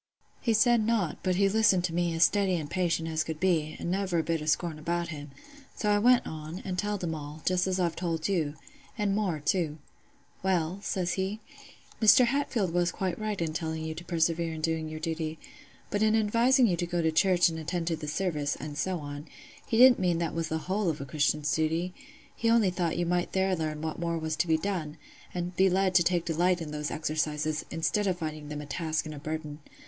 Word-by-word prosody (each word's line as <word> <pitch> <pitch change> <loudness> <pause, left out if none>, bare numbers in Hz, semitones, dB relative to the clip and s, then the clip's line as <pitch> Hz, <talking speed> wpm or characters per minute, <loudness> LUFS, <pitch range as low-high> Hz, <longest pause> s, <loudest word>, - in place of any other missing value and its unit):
"He 230 - +2
said 235 +1 +4
nought; 215 -7 0
but 185 -1 +1
he 195 +2 +3
listened 195 -3 +3
to 175 -2 -1
me 175 0 +1
as 165 - +4
steady 195 +1 +3
an' 155 -4 -4
patient 170 -3 0
as 160 -1 0
could 160 0 -5
be, 165 -5 +1
an' 170 - -3
never 190 -2 0
a 165 - +2
bit 165 -1 -1
o' 155 - -6
scorn 160 0 0
about 170 +2 -2
him; 145 -3 -7 0.5
so 210 - 0
I 205 - +4
went 245 +3 +5
on, 155 +2 -6
an' 185 - -2
telled 205 +1 -2
him 165 -2 -1
all, 150 0 -8
just 185 0 +2
as 185 0 0
I've 170 -2 0
telled 165 -2 -2
you—an' 200 - -3
more 195 -7 0
too. 155 0 0 0.6
"'Well,' 185 -1 0
says 180 -3 -1
he, 190 +3 -2 0.6
'Mr. 245 +4 +7
Hatfield 235 -8 0
was 175 -1 +2
quite 185 0 -3
right 215 -2 -2
in 165 -2 -1
telling 160 0 -3
you 160 - -3
to 170 +2 -8
persevere 165 -1 0
in 155 - -6
doing 160 -1 -1
your 155 0 -6
duty; 160 -1 -3 0.5
but 205 - 0
in 220 0 +4
advising 235 +4 +4
you 185 -6 +2
to 175 - -2
go 175 -1 -1
to 160 - +2
church 180 +1 +4
and 160 -1 -3
attend 170 +2 -3
to 165 -1 0
the 155 -1 -7
service, 150 -3 -1
and 150 -1 -7
so 185 +1 0
on, 145 +1 -7 0.4
he 225 - 0
didn't 250 +1 +8
mean 175 -2 +1
that 165 -1 -2
was 165 -1 -2
the 160 - -1
whole 195 0 0
of 155 - -2
a 140 - -5
Christian's 150 +1 0
duty: 165 +3 0 0.4
he 230 - 0
only 225 -5 +4
thought 175 -2 -1
you 175 - 0
might 175 0 0
there 190 0 +2
learn 155 -2 -3
what 160 +1 -3
more 170 -1 -1
was 160 -1 -2
to 175 - +1
be 160 -1 +3
done, 160 -4 -3 0.3
and 175 0 -4
be 190 +1 +4
led 190 0 +2
to 180 - +6
take 175 0 +1
delight 175 +2 +2
in 160 -3 -6
those 150 0 -3
exercises, 155 0 -1
instead 165 +6 0
of 185 -2 0
finding 155 -3 -5
them 150 0 -5
a - - -7
task 155 +2 -2
and 155 - -6
a 145 - -8
burden. 155 0 -5
170 Hz, 225 wpm, -29 LUFS, 155-190 Hz, 0.6 s, didn't